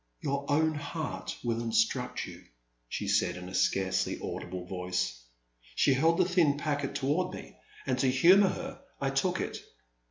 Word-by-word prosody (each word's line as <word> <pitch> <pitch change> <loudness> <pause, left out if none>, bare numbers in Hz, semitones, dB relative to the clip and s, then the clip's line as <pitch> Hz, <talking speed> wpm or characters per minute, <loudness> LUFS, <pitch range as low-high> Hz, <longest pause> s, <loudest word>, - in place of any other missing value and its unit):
'' - - -45
" - - -44
Your 140 0 -2
own 160 +2 +3
heart 155 0 -4
will 115 -1 0
instruct 125 - 0
you," - - -11 0.5
she 105 - -3
said, 100 -3 +2
in 90 0 -8
a 95 - -9
scarcely 95 -1 +1
audible 90 0 -5
voice. 90 -9 -2 0.5
She 140 - +4
held 160 +6 +3
the - - +4
thin 170 -6 +3
packet 145 -2 -2
toward 145 +7 0
me, - - -10 0.3
and - - 0
to 135 - +3
humour 180 +10 +6
her 270 +1 -6 0.2
I 135 -1 0
took 155 +7 +1
it. - - -3
140 Hz, 170 wpm, -30 LUFS, 100-160 Hz, 0.5 s, humour